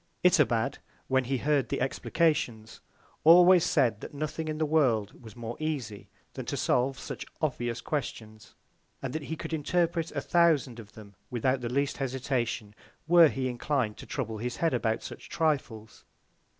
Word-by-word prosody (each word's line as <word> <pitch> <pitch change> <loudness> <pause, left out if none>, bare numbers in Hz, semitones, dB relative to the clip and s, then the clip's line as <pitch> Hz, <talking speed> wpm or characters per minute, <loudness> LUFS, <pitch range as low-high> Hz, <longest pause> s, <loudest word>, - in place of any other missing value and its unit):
Itobad, 140 - +3 0.3
when 130 -1 +2
he 135 +2 -1
heard 145 +1 +1
the - - -1
Explications, 135 -5 -1 0.4
always 175 +2 +8
said 125 -11 +2
that - - -9
nothing 155 +2 -4
in 155 0 -3
the 155 - +1
World 130 -10 +1
was 110 -2 -12
more 120 0 -6
easy, 130 - -4 0.2
than - - -5
to - - -2
solve 130 +2 +1
such - - -6 0.2
obvious 120 -6 -2
Questions; 110 -7 -5 0.5
and 130 -1 -3
that 155 - -3
he 160 - -4
could 160 - -6
interpret 165 +1 0
a 145 - -1
thousand 155 -9 +2
of 110 -2 -12
them 105 -2 -13 0.2
without 130 +2 0
the 120 - -3
least 140 +3 0
Hesitation, 130 -5 -2 0.3
were 170 -1 +8
he 130 -3 -2
inclin'd 125 -3 -1
to - - -11
trouble 115 -6 -4
his 120 +1 -3
Head 165 -4 0
about 115 -2 0
such - - -9
Trifles. 135 -9 -2
135 Hz, 165 wpm, -28 LUFS, 115-155 Hz, 0.5 s, always